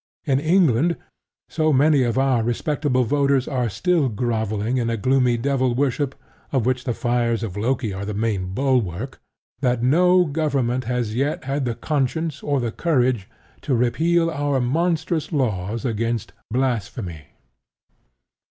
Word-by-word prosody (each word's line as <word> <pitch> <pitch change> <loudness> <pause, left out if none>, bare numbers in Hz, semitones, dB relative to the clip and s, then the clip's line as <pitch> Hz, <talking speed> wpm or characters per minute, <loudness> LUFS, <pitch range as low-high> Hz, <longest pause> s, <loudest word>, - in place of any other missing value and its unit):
In 135 -3 +2
England, 165 -1 +3 0.5
so 155 -1 +1
many 145 +1 +4
of 120 -2 0
our 135 -3 +2
respectable 130 +3 0
voters 140 +1 +1
are 125 -5 -1
still 140 - +1
grovelling 110 0 -1
in 120 -2 0
a 115 - -1
gloomy 125 +1 +2
devil 130 0 0
worship, 140 +1 0 0.4
of 130 -5 +1
which 125 0 0
the 120 - 0
fires 120 -2 0
of 100 -5 -5
Loki 115 0 -1
are 95 +1 -5
the 105 0 -4
main 100 -4 -1
bulwark, 125 -3 -1 0.4
that 125 -3 0
no 180 +7 +4
Government 140 -5 -1
has 120 -3 -1
yet 140 +5 -1
had 135 +1 -2
the 120 -2 -2
conscience 150 +2 -1
or 145 -2 0
the 120 -2 -2
courage 125 - 0 0.3
to 135 - 0
repeal 165 +8 +2
our 145 -3 0
monstrous 160 +5 0
laws 115 - -1
against 115 -4 -2 0.2
"blasphemy." 110 - -2
130 Hz, 140 wpm, -22 LUFS, 115-145 Hz, 0.5 s, many